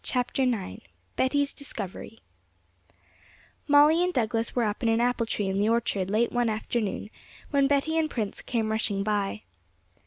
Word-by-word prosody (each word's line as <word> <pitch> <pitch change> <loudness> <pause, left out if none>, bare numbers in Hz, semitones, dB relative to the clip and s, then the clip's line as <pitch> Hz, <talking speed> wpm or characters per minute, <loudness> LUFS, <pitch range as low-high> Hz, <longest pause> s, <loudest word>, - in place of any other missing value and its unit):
CHAPTER 250 +1 -1
IX 225 - -1 0.3
Betty's 285 +2 +1
Discovery 225 -5 -7 1.5
Molly 300 +4 +6
and 360 - +1
Douglas 230 -4 -1
were 245 - +2
up 210 +2 -2
in 230 - +1
an 225 0 +2
apple 240 -1 +1
tree 205 -2 -1
in 190 +1 -1
the 210 +2 +2
orchard 215 -5 0
late 220 +4 +1
one 245 -1 +1
afternoon, 215 -1 -3 0.4
when 280 -2 +3
Betty 290 +3 +1
and 315 -1 0
Prince 215 -7 -4
came 225 -3 -1
rushing 210 -2 0
by. 210 0 -1
230 Hz, 155 wpm, -27 LUFS, 215-270 Hz, 1.5 s, Molly